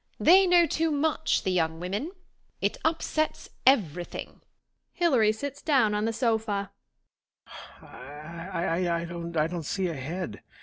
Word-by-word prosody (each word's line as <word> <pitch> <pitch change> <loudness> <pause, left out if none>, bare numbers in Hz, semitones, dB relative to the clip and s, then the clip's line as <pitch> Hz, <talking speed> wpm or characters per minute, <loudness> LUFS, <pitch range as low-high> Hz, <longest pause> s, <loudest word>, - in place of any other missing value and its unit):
They 375 +3 +6
know 350 -1 +6
too 325 +1 0
much, 310 +1 +1
the 190 - 0
young 160 -2 0
women. 200 - -3 0.5
It - - 0
upsets 315 -1 -1 0.2
every 180 - +4
thing. - - -9 0.6
IHUary 255 -11 +4
sits 285 +4 -6
down 255 -9 +3
on 210 +1 0
the 225 - +1
sofaJi 220 -4 -1 0.8
HILARY 165 +5 -6
IBroken,"] 170 0 -3
I 155 - +3
don't 170 +1 -4
see 185 +4 -2
ahead. 155 - -5
200 Hz, 130 wpm, -27 LUFS, 170-285 Hz, 0.8 s, They